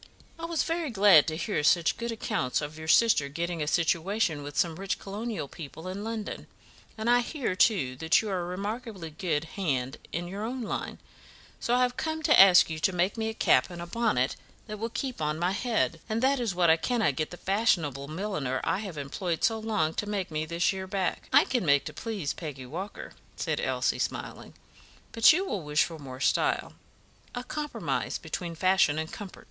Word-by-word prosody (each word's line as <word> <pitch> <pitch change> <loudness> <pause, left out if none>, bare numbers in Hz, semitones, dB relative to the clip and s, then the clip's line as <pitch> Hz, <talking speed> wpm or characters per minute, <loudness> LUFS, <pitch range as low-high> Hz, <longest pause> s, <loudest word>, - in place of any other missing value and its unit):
I 330 - -4
was 335 -1 0
very 330 -2 -2
glad 200 - +6
to 160 -1 -2
hear 175 -2 -1
such 165 +2 +3
good 235 0 -4
accounts 130 - -1
of 150 +1 -5
your 160 0 -8
sister 185 -7 +4
getting 170 +2 -3
a 150 - -1
situation 165 +1 +1
with 145 0 -8
some 170 -4 +2
rich 195 +1 -2
colonial 210 -3 -5
people 160 +4 -9
in 190 +2 -5
London; 220 -1 -5 0.5
and 220 +1 -3
I 245 0 +5
hear, 245 - -2
too, 185 - +2
that 160 +3 +3
you 220 - -3
are 185 -2 -1
a - - -4
remarkably 200 -1 -5
good 155 -2 -1
hand 140 -7 -2
in 175 +1 -3
your 200 +4 -5
own 245 +2 -3
line, 215 - -4 0.6
so 240 - +1
I 250 - +4
have 250 0 -1
come 315 0 -2
to 300 - +5
ask 190 -2 +8
you 160 -1 -5
to 190 - +2
make 180 +2 0
me 220 -1 -2
a 220 - -6
cap - - +3
and 175 -1 -8
a 170 - -5
bonnet 175 - 0 0.3
that 215 -1 -7
will 225 +2 -2
keep 250 - -4
on 150 0 0
my 175 +2 +1
head; 225 +3 0
and 220 +1 0
that 270 +1 +3
is 225 -7 -1
what 175 -2 +4
I 160 - +5
cannot 220 - +1
get 155 +3 -2
the 175 - -9
fashionable 170 - 0
milliner 155 -6 -2
I - - 0
have 195 -7 -6
employed 160 +4 -3
so 225 -1 +2
long 210 -8 0
to 210 - -3
make 195 -5 -2
me 155 0 -2
this 170 +3 +1
year 190 0 -5
back." 190 -2 -2
"I - - +6
can 245 -5 0
make 140 -3 +3
to 155 - -6
please 200 -5 -3
Peggy 145 -6 -7
Walker," 180 +10 -7 0.2
said - - -2
Elsie, - - 0
smiling; - - -4 0.6
"but 230 +5 +7
you 365 +5 +1
will 205 - -3
wish 150 0 +2
for 165 -2 -6
more 130 -3 -9
style - - +1 0.6
a 245 - -3
compromise 295 +3 -3
between 170 -2 -5
fashion 185 -3 +3
and 160 0 -3
comfort." 200 -3 -8
185 Hz, 205 wpm, -28 LUFS, 160-220 Hz, 0.6 s, ask